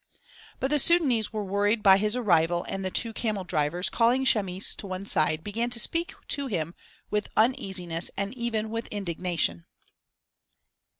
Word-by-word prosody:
But 265 - -1
the 300 - +4
Sudânese 280 -9 +4
were 215 -2 -3
worried 205 +3 +1
by 190 -2 +7
his 210 +2 0
arrival 175 -7 +2
and 195 0 -4
the 185 - -1
two 225 +4 -1
camel 215 -4 -2
drivers, 170 +1 0
calling 245 +3 +2
Chamis 195 -5 +1
to 200 - -7
one 185 +1 -5
side, 155 -3 +1
began 230 +4 -2
to 240 -1 -4
speak 335 +9 0
to 280 -1 -2
him 170 - -2 0.4
with 210 0 -1
uneasiness 185 -7 0
and 200 +2 -2
even 225 -3 -2
with 230 0 -4
indignation. 170 - -2
205 Hz, 160 wpm, -27 LUFS, 180-230 Hz, 0.4 s, by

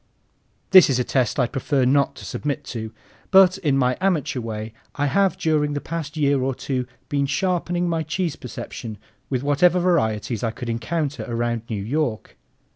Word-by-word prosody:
This 185 -4 +9
is 130 - +2
a 125 - +1
test 130 +1 0
I'd 125 -2 +1
prefer 135 -1 0
not 140 +2 +2
to - - -10
submit 145 -2 -3
to, 110 -2 -5 0.4
but 190 -1 +6
in 145 -7 +1
my 125 -1 +2
amateur 170 -9 0
way 110 -1 -5 0.2
I 145 - 0
have 195 +7 +2
during 150 -2 +1
the 145 - -1
past 160 -1 -5
year 140 -2 +2
or 130 0 -1
two 125 -2 -3 0.2
been 140 -1 0
sharpening 175 +2 0
my 165 -1 0
cheese 160 +1 -2
perception 115 -2 -7 0.3
with 130 -1 -1
whatever 165 +6 +3
varieties 115 - 0
I 115 - +1
could 115 +2 -6
encounter 145 +6 -2
around 120 -1 -1
New 105 -4 -3
York. 120 -3 -2
140 Hz, 175 wpm, -23 LUFS, 120-165 Hz, 0.4 s, This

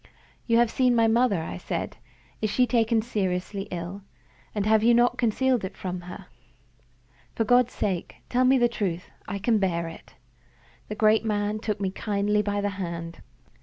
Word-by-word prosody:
"You 230 -1 +4
have 235 -1 +3
seen 250 -2 +3
my 230 -1 +4
mother," 225 -4 +3
I 90 - -5
said. - - -4 0.4
"Is 215 - 0
she 250 +4 +2 0.4
seriously 195 -3 -2
ill? 175 +3 -5 0.5
and 205 -1 0
have 215 0 +4
you 235 +1 +5
not 240 +1 +3
concealed 250 +1 +1
it 190 - -6
from 180 -1 -4
her? 180 +2 -9 1.1
For 225 - +1
God's 245 +2 +3
sake, 185 -4 -2
tell 255 +1 +2
me 260 +1 +5
the 240 -1 +4
truth; 185 -7 -3 0.2
I 200 - -3
can 215 +2 +2
bear 170 -4 0
it." 165 - -12 0.7
The 210 - -5
great 215 +1 +4
man 210 -1 -1
took 215 -2 -3
me 195 -2 -1
kindly 210 +1 0
by 205 0 -1
the 205 - 0
hand. 170 -1 -5
210 Hz, 170 wpm, -26 LUFS, 190-235 Hz, 1.1 s, you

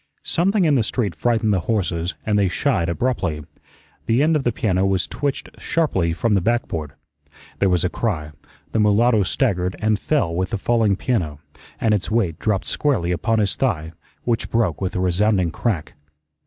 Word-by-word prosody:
Something 190 +2 +1
in 155 - +4
the 130 - +3
street 110 -3 -1
frightened 110 +6 +1
the 95 - +2
horses 90 -6 -1
and 105 -1 +2
they 100 - +3
shied 85 -1 0
abruptly. 90 -7 -1 0.6
The 115 +5 +3
end 160 +1 +3
of 150 - +1
the 120 - +1
piano 95 -4 0
was 95 -2 +1
twitched 140 -1 -3
sharply 95 - 0
from 105 +6 0
the 100 - +3
backboard. 85 -9 -1 0.7
There 100 - +3
was 90 -2 +2
a - - +3
cry, 80 -11 -2 0.4
the 110 - 0
mulatto 105 +2 +4
staggered 90 -3 0
and 110 -1 +1
fell 125 - 0
with 90 +2 -1
the 110 - -2
falling 110 -1 +2
piano, 90 - -1 0.4
and 110 -2 +2
its 100 -3 -1
weight 105 -8 0
dropped 105 -3 0
squarely 125 -13 0
upon 110 +7 0
his 105 -2 +1
thigh, 80 -12 -1 0.3
which 115 -2 -1
broke 110 -9 0
with 95 - -2
a - - 0
resounding 95 0 +2
crack. 95 -5 -2
105 Hz, 180 wpm, -21 LUFS, 90-115 Hz, 0.7 s, in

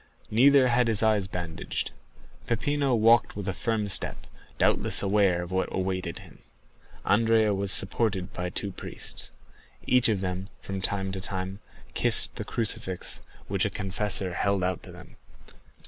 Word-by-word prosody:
Neither 130 +4 +5
had 120 0 +2
his 110 -1 +2
eyes 105 -3 +2
bandaged. 85 -3 -4 0.6
Peppino 140 +3 0
walked 115 +1 +4
with 100 -1 -6
a 95 - -1
firm 110 0 -2
step, 95 - +1 0.3
doubtless - - +3
aware 95 -3 +2
of 85 - -9
what 95 0 -1
awaited 95 0 -3
him. - - -14 0.7
Andrea 110 0 +3
was 100 0 -1
supported 95 -1 +2
by 90 0 -4
two 100 +2 -3
priests. - - -5 0.6
Each 125 -2 +3
of 105 -4 0
them, 95 0 -4
from 95 -1 -6
time 95 0 -2
to 95 0 -5
time, 95 +1 -3 0.3
kissed - - +4
the - - -4
crucifix 110 -5 -2 0.3
a - - +1
confessor 95 -1 -2
held 100 +1 0
out 90 -1 -1
to - - -12
them. - - -14
100 Hz, 145 wpm, -27 LUFS, 95-110 Hz, 0.7 s, Neither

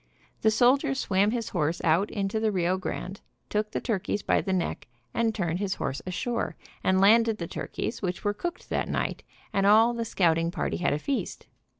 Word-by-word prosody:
The 220 - +5
soldier 270 +5 +3
swam 200 -5 +2
his 230 -1 -2
horse 165 -1 0
out 170 +5 +3
into 200 +1 -1
the 220 -1 +1
Rio 180 -1 +1
Grande, 190 +1 -5 0.3
took 210 0 0
the - - -2
turkeys 205 -2 -2
by - - +2
the 190 - -3
neck 185 -2 -2 0.3
and 230 -1 +2
turned 175 -3 -1
his 195 -2 -1
horse 135 - -3
ashore, 235 +6 -2 0.3
and 190 0 +3
landed 225 +2 +5
the 170 - -4
turkeys, 225 +6 -4
which 180 -2 -3
were 205 -1 +1
cooked 350 +11 -5
that - - -1
night, - - -2 0.3
and 195 0 +2
all 225 +3 +6
the 235 -1 -2
scouting 165 -6 +2
party 175 - -2
had 175 - +1
a - - +1
feast. 270 - -3
200 Hz, 195 wpm, -27 LUFS, 180-225 Hz, 0.3 s, all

